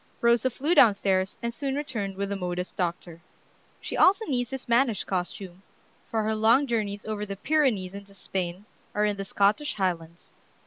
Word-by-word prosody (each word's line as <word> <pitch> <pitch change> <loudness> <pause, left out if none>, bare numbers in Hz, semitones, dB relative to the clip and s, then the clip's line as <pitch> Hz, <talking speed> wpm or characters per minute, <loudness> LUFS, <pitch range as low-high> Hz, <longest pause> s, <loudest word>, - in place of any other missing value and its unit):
Rosa 235 +1 +3
flew 290 +7 0
down 235 - +7
stairs, 190 -1 0
and 235 0 -2
soon 270 +2 -3
returned 225 -10 -3
with 200 +1 -3
the 200 - -2
modest 180 -1 -4
doctor. 170 -2 -3 0.6
She - - -5
also 400 +4 +5
needs 245 -4 -1
this 265 -1 -6
mannish 235 -3 +2
costume, 185 0 -4 0.5
for 220 -1 -1
her 220 +1 0
long 225 +6 +4
journeys 210 -5 -2
over 215 -1 -3
the 200 -1 -5
Pyrenees 240 -9 +1
into 200 0 -10
Spain 185 0 -4 0.3
or 210 0 +2
in 205 -1 0
the 195 - -3
Scottish 210 +10 +1
Highlands. 170 -3 -3
205 Hz, 175 wpm, -27 LUFS, 190-240 Hz, 0.6 s, down